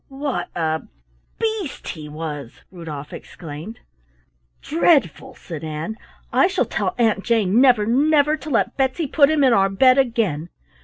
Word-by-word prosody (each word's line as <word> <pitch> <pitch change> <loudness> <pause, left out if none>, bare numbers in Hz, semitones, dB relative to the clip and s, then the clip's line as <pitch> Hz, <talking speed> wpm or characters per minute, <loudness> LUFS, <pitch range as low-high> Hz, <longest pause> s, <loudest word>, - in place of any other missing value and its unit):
"What 275 -1 -4
a 160 -1 -1 0.6
beast 435 -9 -3
he 155 -2 -7
was!" 150 -5 -7
Rudolf 155 -5 -8
exclaimed. 165 +8 -9 0.8
"Dreadful!" 300 - +1
said 160 -3 -9
Ann. 155 +7 -4 0.4
"I - - +5
shall 380 0 0
tell - - -2
Aunt 220 -4 +1
Jane 225 -1 +2
never, 245 -6 +5
never 295 +5 +3
to 310 0 -9
let 250 - 0
Betsy 270 +4 0
put 285 +1 +4
him 310 -2 +2
in 255 -3 +5
our 195 -2 +3
bed 255 +7 +4
again." 220 - 0
230 Hz, 145 wpm, -21 LUFS, -, 0.8 s, I